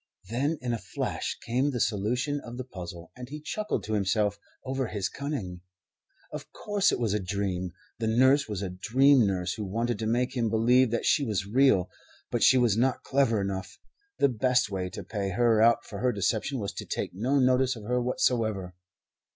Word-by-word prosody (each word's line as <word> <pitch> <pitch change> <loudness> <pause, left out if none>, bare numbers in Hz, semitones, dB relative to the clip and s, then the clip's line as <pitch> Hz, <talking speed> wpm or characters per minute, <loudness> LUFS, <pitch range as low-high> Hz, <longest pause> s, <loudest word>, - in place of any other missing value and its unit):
Then 140 +7 0
in 120 -1 -1
a 115 - -2
flash - - -4
came 130 +5 +1
the 125 -4 -3
solution 120 +8 0
of 120 +1 -9
the 130 - -4
puzzle, 90 -7 -9
and 125 0 -9
he 150 +2 -6
chuckled 210 +7 -3
to 110 - -4
himself 100 0 +1 0.3
over 130 -1 -2
his 105 -3 -2
cunning. 110 -12 -5 0.7
Of - - -8
course 205 -2 +1
it - - 0
was 115 -4 0
a 105 - +1
dream. 95 -1 -2 0.3
The 115 - -1
nurse 130 +5 +4
was 100 -2 -3
a 95 - -3
dream 125 +6 +4
nurse, 90 -2 -1
who 105 - -5
wanted 115 +3 -2
to 110 - -2
make 125 +3 0
him 115 -3 +1
believe 120 +3 +4
that 115 +1 -2
she 145 - +3
was 105 -6 -1
real. 110 -4 +3 0.4
But 120 - -1
she 130 - +6
was 120 -5 +3
not 125 +3 +1
clever 130 -5 +2
enough. 95 0 -4 0.4
The - - +4
best 125 -1 +1
way 95 -2 -2
to - - -7
pay 100 -3 -3
her 115 0 +3
out 115 +1 +4
for - - -7
her 125 0 +2
deception 110 +5 -1
was 100 -4 -4
to - - -6
take - - -3
no 125 +9 0
notice 130 0 +3
of 110 - -10
her 125 +3 0
whatsoever. 110 -6 0
115 Hz, 200 wpm, -28 LUFS, 100-130 Hz, 0.7 s, she